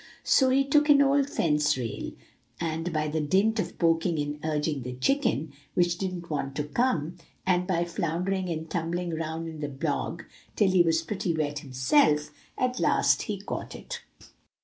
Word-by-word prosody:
So 265 -1 +4
he 270 +1 +4
took 295 +2 +3
an 285 -1 +7
old 280 0 +3
fence 150 - +2
rail; 120 -4 -4 0.5
and 165 +1 -2
by 155 -1 0
dint 190 +9 +1
of 195 - -3
poking 165 0 +2
and 145 0 -3
urging 150 -2 -1
the 125 +1 -5
chicken, 155 - 0 0.2
which 175 0 +2
didn't 185 -3 -4
want 140 -2 -2
to 150 - -1
come, 170 - 0 0.3
and 180 -1 +2
by 175 -3 +1
floundering 180 +3 -2
and 160 -1 -3
tumbling 170 +1 -2
round 160 +1 -3
in 160 -1 -7
the 145 -1 -3
bog 145 +4 -3 0.3
till 200 -3 +3
he 185 -1 +5
was 165 -1 +2
pretty 190 -2 -2
wet 145 -1 -1
himself, 150 - +2 0.3
at 255 0 0
last - - +3
he - - -4
caught - - -5
it. 480 -1 -7
165 Hz, 170 wpm, -27 LUFS, 150-190 Hz, 0.5 s, an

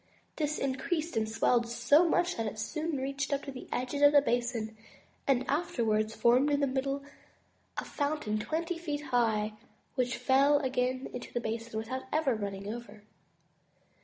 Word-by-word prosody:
This 300 -1 0
increased 290 +4 -1
and 220 -1 +1
swelled 235 +1 +2
so 275 +9 +4
much 355 +2 +2
that 225 - -2
it 215 - -5
soon 310 +7 -2
reached 275 +2 -2
up 280 0 0
to 275 - -6
the 255 - -9
edges 255 +3 -2
of 290 0 +7
the 285 - +8
basin, 240 -4 -1 0.5
and 260 -2 +2
afterwards 225 -8 0
formed 250 +5 +4
in 285 -1 +2
the 285 - +3
middle 275 +1 -1 0.7
a - - -2
fountain 285 -8 -1
twenty 330 +7 -2
feet 295 -3 -3
high, 220 -3 +2 0.4
which 250 -2 0
fell 280 +2 +4
again 255 -1 0
into 245 - -6
the 240 - -1
basin 230 0 -4
without 260 +4 -4 0.3
running 200 0 -4
over. 220 -3 -10
260 Hz, 160 wpm, -31 LUFS, 230-285 Hz, 0.7 s, the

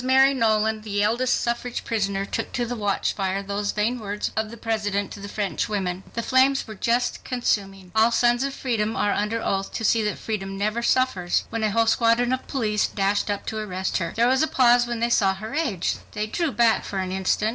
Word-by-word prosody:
Mary 265 +1 +5
Nolan, 220 -3 +1
the 205 -1 -1
eldest 240 +4 +1
suffrage 240 +1 -3
prisoner, 200 -3 -1
took - - -4
to 245 - -1
the 245 +1 -4
watchfire 200 -2 -1
those 200 +1 -2
vain 225 +4 0
words 210 -1 -3
of 220 0 -1
the 235 - -10
President 205 -3 -2
to 205 - -8
the 200 0 -7
French 205 +1 -2
women. 190 -3 -2
The 230 - -2
flames 265 +2 +3
were 220 - -8
just 235 +4 0
consuming—"All 205 -3 0
sons 240 +1 +2
of 275 0 -3
freedom 225 -4 -1
are 205 - +1
under 215 +2 -1
oath 195 0 -1
to - - -4
see 225 +1 +3
that 210 - -1
freedom 195 -3 -4
never 215 +4 -1
suffers," 235 -8 +1
when 225 0 -2
a 215 - +2
whole 230 +2 +2
squadron 230 +2 +3
of 260 - -3
police 215 -6 0
dashed 200 +1 0
up 205 -1 -2
to 220 - -3
arrest 190 -3 -2
her. 170 -2 -3
There 235 +2 +3
was 260 +1 +3
a 315 - +3
pause 245 -3 +4
when 240 -1 -3
they 235 - +2
saw 195 -4 +3
her 215 +6 -7
age. 250 - -1 0.2
They 210 0 -2
drew 310 +8 -1
back 235 -3 +3
for 200 - -5
an 185 -1 -2
instant. 190 +3 +1
220 Hz, 215 wpm, -24 LUFS, 200-240 Hz, 0.2 s, Mary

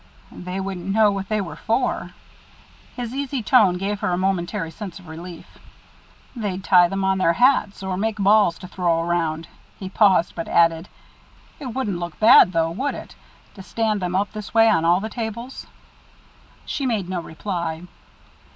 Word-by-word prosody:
"They 180 +1 -6
wouldn't 190 -2 -5
know 210 0 +4
what 195 -1 -5
they 215 -1 0
were 185 - -6
for." 235 +3 -1 0.9
His 245 -1 -5
easy 275 -2 -3
tone 210 -8 +4
gave 200 +2 -3
her - - -1
a 175 - 0
momentary 175 -3 -2
sense 195 +1 -8
of 185 -3 -14
relief. 165 +2 -11 0.8
"They'd 195 -5 -4
tie 180 -2 +5
them 195 +2 -3
on 190 0 +1
their 170 -2 +3
hats, 240 -4 +2
or 190 -1 -2
make 220 +2 -1
balls 200 -3 +3
to 180 - -10
throw 175 -2 0
around." 165 -2 -1 0.3
He 190 - -7
paused, 190 -4 +3
but 165 - -5
added: 165 +1 +2 0.7
"It 285 - -6
wouldn't 210 -9 -2
look 175 -3 -7
bad, 220 -4 +7
though, 165 -1 0
would 265 +12 -2
it? - - -10 0.4
to 195 - -11
stand 215 +1 -1
them 180 0 -2
up 200 +2 0
this 215 0 -8
way 225 0 +6
on 165 -5 +1
all 175 +3 +3
the 220 - -3
tables." 235 +3 -6 1.0
She 275 - -3
made 215 -7 -1
no 180 -1 -3
reply. 170 -1 -5
190 Hz, 175 wpm, -22 LUFS, 175-215 Hz, 1.0 s, bad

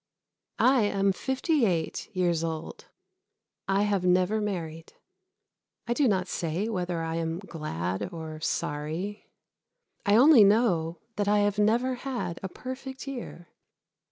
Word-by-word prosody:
I 260 -1 +4
am 195 -1 +2
fifty 265 - 0
eight 170 -7 -1
years 175 -3 +1
old. 160 -1 -5 0.8
I 195 +1 +2
have 200 -3 +1
never 185 +4 +2
married. 165 -6 -4 0.9
I 235 - 0
do 275 +2 +2
not 190 -4 +1
say 175 +4 -2
whether 180 -6 -2
I 165 0 -2
am 165 0 -2
glad 150 - -4
or 160 -2 -7
sorry. 160 +8 -3 0.7
I 205 -1 +3
only 260 -1 +8
know 190 -6 +3 0.2
that 205 -1 0
I 205 0 +4
have 205 0 0
never 235 +5 +2
had 245 -11 -3
a 190 - -4
Perfect 265 +4 -7
Year. 240 -10 -7
195 Hz, 130 wpm, -28 LUFS, 165-225 Hz, 0.9 s, only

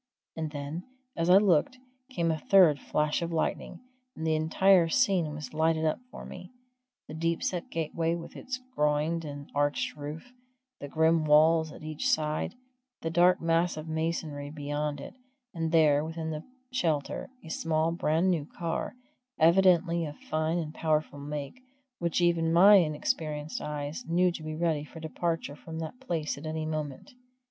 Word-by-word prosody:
And 160 -1 -3
then, 145 +3 -5 0.3
as 165 +1 0
I 185 - +9
looked, 195 +3 +3 0.3
came 170 -10 0
a 160 - -2
third 175 -6 +5
flash 150 +3 0
of 170 0 -3
lightning, 165 - -2 0.3
and 160 - -5
the 160 - +2
entire 165 +3 +4
scene 185 -7 +2
was 150 -3 -7
lighted 160 0 +1
up 155 - +1
for - - -9
me 180 0 -9 0.6
the 150 - -8
deep 165 +1 -1
set 175 -2 -2
gateway 165 +1 -1
with 170 - -9
its 255 0 -5 0.2
groined 150 +3 +1
and 145 -2 -8
arched 145 0 0
roof, 150 +10 -8 0.5
the 145 - -6
grim 160 +2 +2
walls 160 +1 +5
at - - -12
each 155 -1 -2
side, 155 +7 0 0.5
the 165 - -1
dark 180 +2 +4
massive 165 -1 0
masonry 160 -2 -3
beyond 145 0 -3
it, - - -9 0.4
and 165 -2 -2
there, 150 -3 +4
within 160 0 -4
the 155 0 -5 0.3
shelter, 160 - -1 0.2
a - - -9
small, 160 0 0
brand 170 +2 +1
new 155 -5 -1
car, 170 +7 -4 0.4
evidently 170 0 +4
of 145 - -9
fine 155 +2 -1
and 155 -3 -3
powerful 155 -3 -1
make, 145 - -6 0.4
which 170 0 0
even 170 -2 +2
my 195 +5 +8
inexperienced 155 -2 -1
eyes 150 +6 -4
knew 180 +2 +3
to 170 - -7
be 155 0 -5
ready 160 -2 0
for 155 +2 -11
departure 160 -2 -3
from 160 +2 -9
that 165 +10 -6
place 165 - -3
at 155 - -7
any 155 0 -3
moment. 155 - -5
160 Hz, 165 wpm, -29 LUFS, 150-170 Hz, 0.6 s, I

